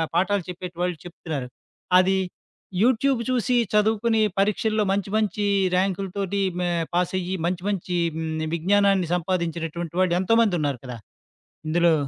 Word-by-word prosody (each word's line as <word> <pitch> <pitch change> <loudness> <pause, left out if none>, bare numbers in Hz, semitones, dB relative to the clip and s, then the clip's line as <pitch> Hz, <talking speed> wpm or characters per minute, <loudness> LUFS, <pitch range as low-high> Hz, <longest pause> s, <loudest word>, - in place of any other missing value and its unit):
పాఠాలు 190 +1 +2
చెప్పేటి 180 0 -7
వాళ్ళు 180 -2 -1
చెప్తున్నారు. 155 -6 -5 0.5
అది 190 +1 +3 0.7
యూట్యూబ్ 255 +2 +3
చూసి, 250 0 +1 0.2
చదువుకుని 220 +1 +2 0.2
పరీక్షల్లో 215 +2 +1
మంచి 200 0 -2
మంచి 210 -1 0 0.3
ర్యాంకుల 190 +1 0
తోటి, 200 0 -1 0.2
మ - - 0 0.3
పాసయ్యి 180 +1 0
మంచి 175 0 -3
మంచి, 180 -3 -2 0.2
హ్మ్. 160 -1 -3
విజ్ఞానాన్ని 195 0 +2
సంపాదించినటువంటి 170 -2 -3
వాళ్ళు 180 -2 +2
ఎంతోమంది 225 -1 +3
ఉన్నారు 140 -4 -1
కదా! 125 -2 -6 0.7
ఇందులో 170 +1 +4
185 Hz, 125 wpm, -24 LUFS, 170-205 Hz, 0.7 s, ఇందులో